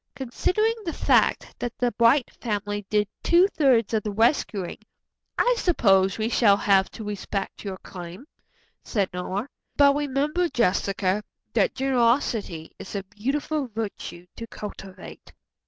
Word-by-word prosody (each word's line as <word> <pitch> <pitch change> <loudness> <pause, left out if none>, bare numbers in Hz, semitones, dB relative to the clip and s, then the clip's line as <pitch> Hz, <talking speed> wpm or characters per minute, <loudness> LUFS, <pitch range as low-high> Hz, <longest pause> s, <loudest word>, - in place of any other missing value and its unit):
"Considering 365 - 0
the 335 -4 -3
fact - - +2
that 245 -1 -4
the 245 -1 +1
Bright 235 +3 +3
family 205 -3 -3
did 210 -1 +2
two 350 +3 +5
thirds 255 - +2
of 220 - +2
the 210 - -4
rescuing, 210 - 0 0.6
I - - +4
suppose 195 - +3
we 220 0 0
shall 215 -4 +4
have 195 -2 +3
to 220 - -7
respect 200 -1 -4
your 195 -2 -5
claim," 180 +6 -10 0.6
said 200 -6 -1
Nora, 190 +6 -3 0.3
"but 280 -1 +6
remember, 295 +5 0
Jessica, 200 -3 0 0.3
that - - +2
generosity 235 - 0
is 190 - -8
a 200 - -2
beautiful 275 +8 -2
virtue 210 -5 -6
to 230 - -7
cultivate." 195 -3 -10
225 Hz, 135 wpm, -25 LUFS, 195-270 Hz, 0.6 s, but